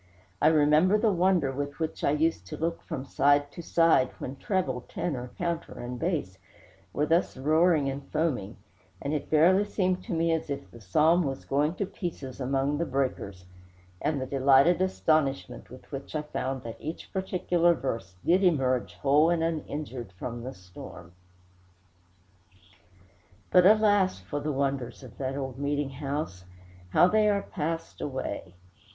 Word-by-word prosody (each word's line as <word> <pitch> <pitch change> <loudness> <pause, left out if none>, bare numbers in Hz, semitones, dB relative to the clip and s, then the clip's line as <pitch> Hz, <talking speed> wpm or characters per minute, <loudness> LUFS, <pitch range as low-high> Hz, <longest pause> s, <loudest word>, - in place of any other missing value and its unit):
I - - +5
remember 155 +5 +5
the 215 0 +2
wonder 180 -6 +2
with 145 +1 -4
which 160 -1 -4
I - - +3
used 150 - 0
to - - -6
look 165 +1 -2
from 130 - -6
side 145 +1 +2
to 170 - -8
side 165 -6 +3
when 130 - -6
treble, 135 -5 -1
tenor, 125 -7 -3
counter, 170 -1 -3
and 120 0 -6
bass 150 - -2 0.5
were 150 - 0
thus 165 -1 +1
roaring 155 +2 +3
and 135 +1 -4
foaming, 145 -12 -1 0.4
and 140 - -3
it 150 - -3
verily 175 +6 +5
seemed 185 -3 -1
to - - -4
me 165 0 +1
as 160 -2 -1
if 140 -10 -5
the 115 - -13
psalm 155 - +3
was 135 -5 -3
going 150 +5 +1
to 200 - -1
pieces 165 -9 -6
among 135 +3 0
the 170 - 0
breakers, 125 - -3 0.6
and 150 -2 0
the 130 - -2
delighted 140 +6 +4
astonishment 155 -9 0
with 130 - -14
which 140 +2 -7
I 150 - -1
found 135 -3 -4
that 115 -1 -8
each 160 +3 -7
particular 180 -2 +2
verse 115 - -4
did 185 +3 +4
emerge 130 -8 +1
whole 145 +4 +3
and 170 -1 +1
uninjured 145 - -4
from 120 +6 -6
the 130 +3 -7
storm. 90 -1 -12 2.4
But 180 0 +7
alas 205 - +4
for 95 +11 -5
the 150 +1 -2
wonders 135 -2 -2
of 125 -5 -13
that 135 0 -2
old 135 -2 -5
meeting 145 -1 -1
house, 135 - -4 0.4
how 175 - +5
they 215 +2 +3
are 200 -1 +1
passed 165 -1 -4
away! 130 -9 -4
145 Hz, 160 wpm, -28 LUFS, 130-170 Hz, 2.4 s, But